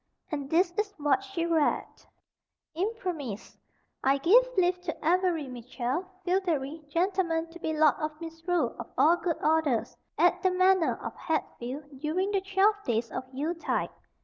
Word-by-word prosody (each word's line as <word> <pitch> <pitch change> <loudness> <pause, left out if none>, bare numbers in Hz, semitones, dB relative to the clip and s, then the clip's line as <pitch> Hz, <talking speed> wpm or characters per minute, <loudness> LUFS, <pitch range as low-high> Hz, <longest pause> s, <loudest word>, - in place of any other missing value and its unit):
And 285 -3 -3
this 345 +3 +3
is 410 -1 -1
what 290 +1 +2
she 390 -4 -3
read: 325 -3 +2 0.9
Imprimis(1): 350 - -4 0.5
I 270 +1 +4
give 455 - +5
leave 360 0 +2
to 320 -3 -4
Avery 350 -4 +2
Mitchell, 250 +6 -3 0.2
feodary, 325 -5 0
gentleman, 335 -1 0
to 345 - -11
be 320 - -2
Lord 305 -2 +6
of 305 -1 -4
Misrule 330 +1 -2
of - - -6
all 335 +3 +6
good 345 -2 -1
orders, 305 -7 +1 0.2
at 355 +1 +3
the 375 - +3
Manor 370 -1 +3
of - - -5
Hatfield, 280 -2 -4
during 350 +7 0
the 395 -2 +1
twelve 390 +2 +2
days 230 -1 -1
of - - -4
Yule 290 +6 -2
tide. 335 - -2
330 Hz, 150 wpm, -28 LUFS, 295-370 Hz, 0.9 s, Lord